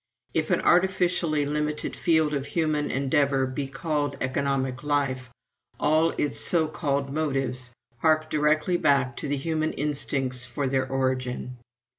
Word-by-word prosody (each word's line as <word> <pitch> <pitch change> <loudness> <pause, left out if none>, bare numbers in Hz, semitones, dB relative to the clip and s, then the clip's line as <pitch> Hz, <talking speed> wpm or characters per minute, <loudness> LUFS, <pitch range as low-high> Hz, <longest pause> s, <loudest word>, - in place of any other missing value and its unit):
If 160 -1 0
an - - +2
artificially 175 -4 +2
limited 150 +1 -2
field 160 -3 +2
of 140 -1 -2
human 155 -2 0
endeavor 140 0 +1
be 135 +1 -4
called 145 +1 -2
economic 130 -1 -1
life, 135 -4 -1 0.5
all 155 +2 +3
its 145 - 0
so 165 -3 +4
called 140 -3 -2
motives 135 -5 -2 0.3
hark 155 +1 +2
directly 155 +3 +1
back 135 -5 +2
to - - -4
the 145 0 -1
human 155 +2 -1
instincts 135 -3 -1
for 125 +3 -2
their 130 0 0
origin. 130 -1 -2
145 Hz, 135 wpm, -26 LUFS, 135-155 Hz, 0.5 s, so